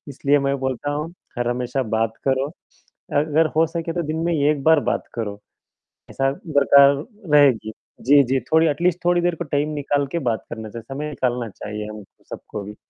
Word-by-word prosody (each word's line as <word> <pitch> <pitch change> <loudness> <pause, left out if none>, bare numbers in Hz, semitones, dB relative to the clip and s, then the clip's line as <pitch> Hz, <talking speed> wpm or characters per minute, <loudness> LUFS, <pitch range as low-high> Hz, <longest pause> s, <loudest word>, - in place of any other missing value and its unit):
इसलिए 145 +1 +2
मैं 140 0 0
बोलता 130 +2 -2
हूँ, 150 +3 -4 0.2
हर 120 - 0
हमेशा 125 +2 -1
बात 110 0 -1
करो। 135 +1 +1 0.7
अगर 155 +2 +2
हो 165 - +5
सके 165 0 -4
तो 175 - -2
दिन 155 - -2
में 170 - +1
एक 145 -1 +1
बार 160 -1 +5
बात - - -2
करो, 105 -3 -4 0.7
ऐसा 135 0 0 0.2
बरकरार 140 -2 +6 0.4
रहेगी, 130 -7 +4 0.3
जी, 145 +2 +6
जी, 130 +1 0
थोड़ी 160 +1 +5
अटलीस्ट 170 +4 +1
थोड़ी 175 0 +3
देर 175 0 +1
को 175 - -5
टाइम 145 +1 +1
निकाल 145 0 0
के 170 - 0
बात 110 - -3
करना 110 -1 -6
चाहिए, 115 0 -8
समय 150 +2 -4
निकालना 125 -4 -2
चाहिए 105 +1 -7
हम 105 0 -8 0.3
सबको 105 - -7
भी। 105 +2 -9
140 Hz, 185 wpm, -22 LUFS, 120-155 Hz, 0.7 s, बरकरार